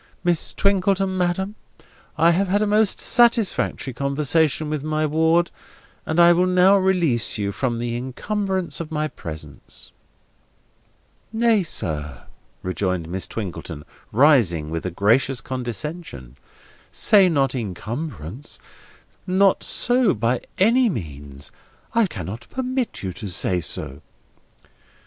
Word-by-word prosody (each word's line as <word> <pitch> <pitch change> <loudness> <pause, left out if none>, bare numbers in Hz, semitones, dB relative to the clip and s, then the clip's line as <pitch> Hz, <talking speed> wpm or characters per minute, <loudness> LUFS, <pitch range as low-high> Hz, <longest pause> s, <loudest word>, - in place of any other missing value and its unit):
Miss 175 -3 0
Twinkleton, 195 -1 +1
madam, 185 +2 -1 0.6
I 165 +2 +5
have 190 +4 +1
had 205 +3 +1
a - - +1
most 210 0 +3
satisfactory 230 - +3
conversation 150 +3 +1
with 150 -2 -3
my 155 0 0
ward, 160 +3 +2 0.6
and 160 +2 0
I 170 0 +7
will 180 +2 +2
now 185 +2 +5
release 175 - +1
you 100 -1 -2
from 120 +3 -2
the 120 0 -3
incumbrance 190 - -3
of 165 -2 -5
my 155 0 -1
presence." 75 - -9 1.4
"Nay, 225 -1 +3
sir," 75 - -4 0.4
rejoined 90 -3 -2
Miss 90 0 -1
Twinkleton, 90 -7 -6 0.3
rising 105 - +3
with 80 +2 -3
a - - -1
gracious 115 +8 +2
condescension: 125 - -6 0.5
"say 195 -3 +4
not 135 -5 +1
incumbrance. 115 - -6 0.7
Not 190 +1 +3
so, 245 -4 +1
by 115 +3 0 0.2
any 235 +5 +4
means. 70 - -7 0.4
I 230 -3 +3
cannot 105 - -7
permit 255 - -3
you 95 -2 -3
to 105 - -7
say 90 -1 -1
so." 70 -2 -4
150 Hz, 120 wpm, -22 LUFS, -, 1.4 s, I